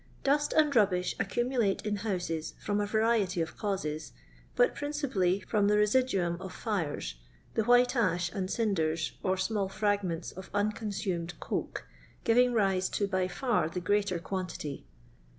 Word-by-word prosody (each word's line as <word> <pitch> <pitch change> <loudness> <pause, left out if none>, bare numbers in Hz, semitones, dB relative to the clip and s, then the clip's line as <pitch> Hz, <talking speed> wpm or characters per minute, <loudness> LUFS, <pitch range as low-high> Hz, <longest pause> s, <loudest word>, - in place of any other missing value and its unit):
Dust 290 +2 +2
and 300 -3 +3
rubbish 185 -5 +3
accumulate 230 0 0
in 210 -1 0
houses 180 -6 -3
from 205 0 -1
a 205 - -1
variety 215 -4 +2
of 165 -1 -2
causes, 185 -8 -3 0.4
but - - +4
principally 255 -11 0
from 205 +1 +1
the 210 0 +4
residuum 210 -6 +2
of 190 -1 -7
fires, 165 - -3 0.4
the 220 - +1
white 245 +2 +5
ash 180 -6 +1
and 190 -3 -3
cinders, 165 -8 0
or 190 -1 +1
small 195 0 0
frag 205 0 +1
ments 170 -2 -3
of 185 +1 -10
unconsumed 200 -4 -2
coke, - - -3 0.4
giving 245 +2 +4
rise 195 -5 +2
to 205 - 0
by 185 -2 0
far 220 - 0
the 180 - -3
greater 200 +1 +1
quantity. 170 -5 -5
200 Hz, 150 wpm, -30 LUFS, 180-225 Hz, 0.4 s, white